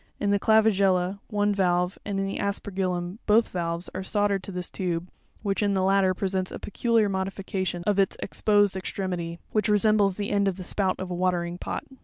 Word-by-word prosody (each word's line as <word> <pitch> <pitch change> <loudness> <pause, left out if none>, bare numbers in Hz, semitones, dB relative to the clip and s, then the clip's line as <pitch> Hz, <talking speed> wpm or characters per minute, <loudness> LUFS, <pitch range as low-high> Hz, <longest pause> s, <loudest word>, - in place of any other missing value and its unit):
In 200 - +1
the 200 - +3
Clavigella 200 -4 +3
one 205 -1 +1
valve, 180 -1 +1
and 200 -1 -2
in 195 - 0
the 195 - -3
Aspergillum 190 -2 -2
both 225 +2 +4
valves, 170 0 -3
are 185 - -3
soldered 200 0 +1
to 195 - -8
this 180 -1 -4
tube, 175 -2 -3 0.4
which, 200 -1 0
in 200 -1 +2
the 190 - +1
latter, 190 -1 +3
presents 190 -1 -1
a - - -5
peculiar 225 +1 +1
modification 190 -2 -3
of 205 -1 +2
its 195 - +2
exposed 205 -2 +2
extremity, 180 -3 -3
which 215 -1 +1
resembles 210 -2 +3
the 205 0 -3
end 200 -1 +2
of 190 -1 -1
the 185 - -6
spout 190 +1 0
of 185 -1 -5
a - - -1
watering 175 -1 -1
pot. - - -4
195 Hz, 195 wpm, -26 LUFS, 180-205 Hz, 0.4 s, both